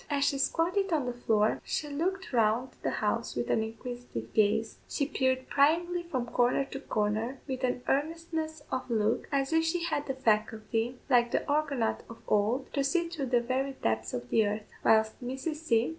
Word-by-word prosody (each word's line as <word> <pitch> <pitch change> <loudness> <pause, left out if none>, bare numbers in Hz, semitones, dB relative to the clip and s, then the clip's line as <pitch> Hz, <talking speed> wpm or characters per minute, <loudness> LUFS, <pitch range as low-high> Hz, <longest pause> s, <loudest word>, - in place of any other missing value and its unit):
As 285 -1 +2
she 275 - +1
squatted 355 +7 +1
on 300 -5 +1
the 245 - -2
floor, 220 -3 +1
she 300 - -2
looked 355 +5 -2
round 230 +2 +2
the - - 0
house - - -1
with - - -1
an - - +3
inquisitive 225 - -6
gaze; 215 +1 +2
she 280 - 0
peered 260 -2 0
pryingly 340 +5 +3
from 270 -8 -3
corner 245 +3 +2
to 270 - -4
corner, 220 +1 -1
with 260 -1 -4
an 250 -1 0
earnestness 315 +2 -1
of 255 0 -2
look, 220 -1 +1
as 275 +1 +1
if 325 0 +4
she 335 +1 0
had 295 -3 -1
the 270 - -2
faculty, 225 0 0
like 240 -3 +4
the - - -1
Argonaut 285 -6 +1
of 230 - -9
old, 215 +6 +1
to 280 - +1
see 340 +4 +1
through 305 -6 -3
the 245 -1 +3
very 260 +3 -1
depths 110 - -1
of 120 0 -5
the 220 -2 +4
earth, 210 +1 -4
whilst 220 +2 +3
Mrs. 265 +5 -3
C. 240 -7 +2
260 Hz, 190 wpm, -30 LUFS, 225-295 Hz, -, if